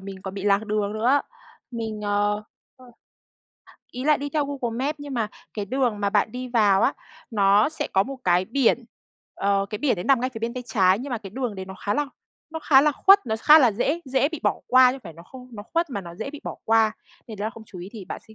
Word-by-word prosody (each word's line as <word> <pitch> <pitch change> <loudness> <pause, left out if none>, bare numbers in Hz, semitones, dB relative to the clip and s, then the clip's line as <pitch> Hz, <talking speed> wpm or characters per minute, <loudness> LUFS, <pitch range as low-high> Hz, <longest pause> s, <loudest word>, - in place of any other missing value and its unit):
mình 190 0 -9
còn 190 0 -6
bị 195 - -6
lạc 205 +1 +2
đường 210 -1 -1
nữa. 245 +6 +2 0.5
Mình, 225 -3 -5
ờ, 205 0 0 0.3
ơ 255 - -17 1.1
ý 250 +1 -6
là 300 0 +4
đi 285 +1 -5
theo 300 -1 0
Google 260 -5 -4
Maps 300 +1 -2
nhưng 290 -2 -7
mà 220 -3 -1 0.3
cái 205 -2 -3
đường 245 -2 -1
mà 200 -1 0
bạn 215 - +1
đi 250 0 -5
vào 205 -5 +3
á, 275 - +3 0.4
nó 205 +1 +4
sẽ 315 - -4
có 190 - +4
một 270 +5 -7
cái 180 0 +3
biển, 245 +2 +1 0.5
ờ, 200 0 0
cái 210 - -4
biển 285 -4 +1
đấy 175 - -5
nằm 270 -3 +3
ngay 255 +1 -1
phía 225 - -8
bên 230 +2 -3
tay 250 - -5
trái, 190 -2 +3
nhưng 270 +2 -6
mà 240 - -2
cái 195 -3 -10
đường 245 -1 -3
đấy 190 -1 -6
nó 190 0 -9
khá 205 +2 -3
là 295 0 0 0.4
nó 320 - -5
khá 270 -3 +5
là 300 0 +3
khuất, 390 +2 +5
nó 220 - -1
khá 310 +1 +8
là 250 -7 +4
dễ 280 +10 -1
dễ 265 +1 +1
bị 320 -2 -7
bỏ - - 0
qua 255 0 +6
chứ - - -6
không - - -22
phải 170 - -8
nó 165 +2 -14
không 255 +7 -13
nó 205 - -8
khuất 335 +8 -2
mà 205 - -3
nó 170 -2 -10
dễ 220 +9 -6
bị 295 - -10
bỏ - - -5
qua. 225 -1 +3 0.4
Thì 220 - -7
đó, 210 +2 -3
không 225 0 -13
chú 185 - -11
ý 180 +2 -8
thì 215 -5 -9
bạn - - -7
sẽ, 220 - -15
225 Hz, 265 wpm, -24 LUFS, 200-265 Hz, 1.1 s, khá